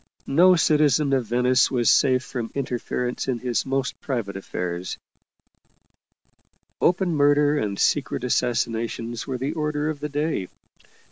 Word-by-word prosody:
No 180 +6 +5
citizen 150 -3 +3
of 130 -4 0
Venice 125 +2 +3
was 120 -3 0
safe 130 0 +4
from 120 -3 -5
interference 125 -2 -3
in 130 -2 0
his 120 +2 -2
most 135 -1 -2
private 115 -8 -3
affairs; 90 -2 -4 1.8
open 180 0 +2
murder 145 0 +3
and 100 -4 -2
secret 135 0 0
assassination 115 -2 -1
were 130 -2 -3
the 135 +5 -3
order 150 -1 -1
of 150 - -8
the 150 +1 -4
day. 145 - -2
130 Hz, 130 wpm, -24 LUFS, 120-150 Hz, 1.8 s, No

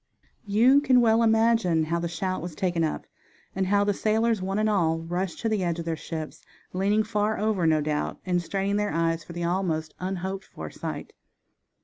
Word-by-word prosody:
You 240 +8 +5
can 255 -3 +5
well 225 -1 +4
imagine 225 -7 +3
how 170 +2 -1
the 170 - -2
shout 185 +3 -3
was 170 -2 -6
taken 175 -2 0
up, 155 - -2 0.5
and 190 0 0
how 200 +1 +3
the 205 0 +1
sailors, 220 +1 +1
one 195 +2 -2
and 215 0 +2
all, 170 -6 +2
rushed 175 +2 -3
to 230 - 0
the 210 -3 0
edge 170 -1 -1
of 170 - -5
their 165 -1 -1
ships, 155 0 -7 0.3
leaning 200 +4 +2
far 210 0 0
over, 205 -5 +1
no 155 -1 +3
doubt, 150 0 -2
and 180 -1 +1
straining 195 +3 -1
their 210 0 0
eyes 165 -1 0
for 170 - -10
the 175 0 -4
almost 170 -3 -1
unhoped 190 +1 -4
for - - -8
sight. - - -6
190 Hz, 200 wpm, -26 LUFS, 170-215 Hz, 0.5 s, You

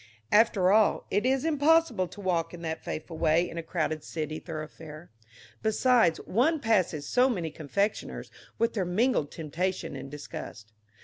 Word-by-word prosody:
After 210 -4 +4
all, 215 0 +3
it 205 +5 +1
is 265 +2 +1
impossible 300 - +3
to 205 - -11
walk 175 -3 -1
in 170 - -11
that 160 -1 -4
fateful 160 +1 -6
way 165 +3 +3
in 170 - -6
a - - -2
crowded 155 -2 -2
city 155 -1 -4
thoroughfare. 155 0 -8 0.5
Besides, 225 -4 +3
one 300 - +2
passes 185 - +1
so 255 +1 +3
many 175 -10 -2
confectioners 200 +8 -2 0.3
with 230 - +1
their 200 - 0
mingled 180 - +1
temptation 170 +1 -3
and 135 0 -7
disgust. 110 -6 -9
180 Hz, 150 wpm, -28 LUFS, 160-225 Hz, 0.5 s, After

